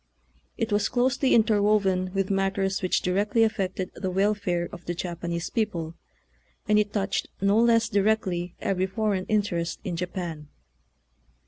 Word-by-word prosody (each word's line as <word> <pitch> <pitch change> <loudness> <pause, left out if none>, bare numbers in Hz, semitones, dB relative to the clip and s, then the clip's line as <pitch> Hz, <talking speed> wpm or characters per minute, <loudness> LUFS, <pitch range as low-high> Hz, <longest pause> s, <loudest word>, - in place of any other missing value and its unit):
It 225 - -2
was 205 0 +2
closely 260 +2 +2
interwoven 205 -4 +3
with 195 0 0
matters 195 0 0
which 185 - +1
directly 205 +5 +2
affected 190 -4 -1
the 190 - -3
wel 195 +3 +2
fare 175 -4 -2
of 175 - -10
the 175 - -3
Japanese 170 -1 -4
people, 170 -8 -2 0.7
and 210 0 +4
it 205 -1 0
touched 195 -1 -1
no 200 +2 +3
less 230 -1 +4
directly 195 -4 0
every 190 -1 0
foreign 195 -1 -1
interest 195 -6 -1
in 175 - -3
Japan. 170 -3 -5
195 Hz, 140 wpm, -26 LUFS, 180-210 Hz, 0.7 s, and